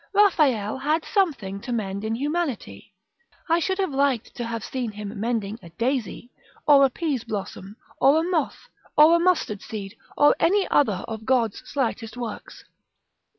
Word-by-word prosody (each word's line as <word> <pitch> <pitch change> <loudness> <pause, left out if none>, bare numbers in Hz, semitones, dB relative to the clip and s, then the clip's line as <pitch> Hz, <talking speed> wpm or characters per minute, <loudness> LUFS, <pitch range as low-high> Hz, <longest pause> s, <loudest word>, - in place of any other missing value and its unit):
Raffaelle 280 - +3
had 310 +4 0
something 270 - -1
to 250 - -6
mend 200 -3 -3
in 220 +1 -1
Humanity: 295 0 -3 0.5
I 330 0 +3
should 375 +3 -1
have 380 -5 0
liked 270 -4 0
to 240 - -4
have 230 -2 -4
seen 250 0 -3
him 205 0 -7
mending 220 -1 -2
a 170 - -12
daisy! 240 +4 -3 0.4
or 285 -2 +7
a 270 - +5
pease 280 -3 -2
blossom, 200 -2 -6 0.2
or 285 +4 +5
a - - 0
moth, 330 -6 -2 0.3
or 310 +3 +8
a - - +3
mustard 335 - +1
seed, 205 -1 -7 0.2
or 290 - +6
any 390 +3 +3
other 215 -10 +2
of 220 -1 -6
God's 240 -5 +1
slightest 245 -4 -2
works. 235 -3 -7
245 Hz, 160 wpm, -24 LUFS, 215-305 Hz, 0.5 s, or